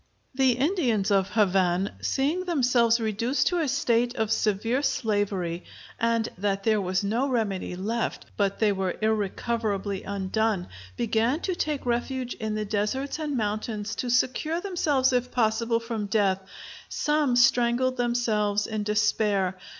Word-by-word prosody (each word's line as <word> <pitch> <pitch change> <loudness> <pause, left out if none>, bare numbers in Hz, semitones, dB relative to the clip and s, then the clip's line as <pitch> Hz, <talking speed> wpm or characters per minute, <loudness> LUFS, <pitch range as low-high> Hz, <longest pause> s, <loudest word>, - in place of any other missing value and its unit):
The 260 -1 +3
Indians 250 - +1
of 195 -1 +2
Havane, 190 -3 +2
seeing 305 +7 0
themselves 245 -8 +3
reduced 230 +4 0
to 355 - 0
a 320 - 0
state 245 -4 +1
of 220 -1 -1
severe 225 +5 +1
slavery, 205 -9 -1 0.4
and 230 -1 +1
that 195 0 -1
there 215 -1 +2
was 185 +1 -1
no 230 +7 0
remedy 205 -7 -1
left, 220 +5 -2
but 200 -1 0
they 215 -2 +3
were 190 -2 -1
irrecoverably 215 -1 -1
undone, 200 0 -1 0.3
began 235 +5 +1
to 375 - -1
take 300 -6 -2
refuge 245 +1 -1
in 220 -2 -4
the 215 0 -2
deserts 215 +9 -2
and 295 -3 -2
mountains 215 0 -2
to 250 - -2
secure 255 +7 +1
themselves 295 -9 +1
if 250 0 +1
possible 230 0 +1
from 230 -3 -4
death; 195 -2 +2 0.5
some 295 -4 +1
strangled 245 +1 +3
themselves 220 -4 +1
in 215 -1 -3
despair. 210 -2 +1
225 Hz, 140 wpm, -26 LUFS, 205-250 Hz, 0.5 s, The